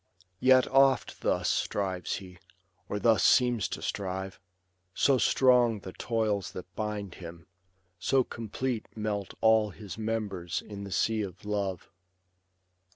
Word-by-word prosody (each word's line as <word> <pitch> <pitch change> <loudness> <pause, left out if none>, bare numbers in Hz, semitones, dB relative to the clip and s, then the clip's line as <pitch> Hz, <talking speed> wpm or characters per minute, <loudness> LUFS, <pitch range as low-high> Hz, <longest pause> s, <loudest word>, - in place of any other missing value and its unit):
Yet 130 0 +5
oft 135 0 +3
thus - - 0
strives 95 -3 -1
he, 90 -2 -10 0.5
or 105 - -2
thus 110 -3 +3
seems 120 -5 +4
to - - -6
strive; 95 -1 -4 0.6
So 135 -2 +3
strong 120 -5 +4
the 95 - -8
toils 110 -4 -1
that 90 0 -9
bind 105 -3 -4
him; 85 -1 -9 0.5
so 130 +7 +2
complete 120 +1 -4
Melt 105 -2 -3
all 110 -1 +4
his 100 0 -9
members 105 -6 -3
in 100 -1 -8
the 100 - -8
sea 110 +3 +1
of 95 -1 -7
love. 100 -4 -3
105 Hz, 130 wpm, -29 LUFS, 95-115 Hz, 0.6 s, Yet